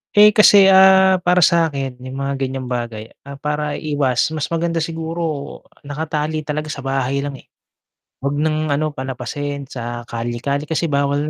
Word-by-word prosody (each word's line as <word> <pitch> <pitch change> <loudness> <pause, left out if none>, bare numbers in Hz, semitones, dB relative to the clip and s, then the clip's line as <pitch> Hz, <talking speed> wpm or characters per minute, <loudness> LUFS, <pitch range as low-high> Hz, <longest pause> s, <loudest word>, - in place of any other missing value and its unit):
Eh, 210 +1 +8
kasi 205 -2 +7
ah, 190 0 +6
para 180 0 +3
sa 170 0 +4
'kin 135 -4 -5
yung 130 +1 -8
mga 140 0 -1
ganyang 130 -1 -3
bagay, 115 -3 -4 0.2
ah, 140 - -7
para 150 +1 -3
iwas 145 -3 0
mas 155 -2 -3
maganda 170 0 -1
siguro 160 -2 -4 0.2
nakatali 155 +1 -3
talaga 150 0 -3
sa - - -6
bahay 135 0 -1
lang 140 0 -4
eh. - - -15 0.8
Wag 140 +1 -1
ng 155 0 0
ano 155 +2 -1
palapasin 135 +1 -5
sa 120 -1 -5
kalye-kalye 120 +6 -3
kasi 160 +2 -1
bawal 140 +1 0
145 Hz, 160 wpm, -19 LUFS, 135-160 Hz, 0.8 s, Eh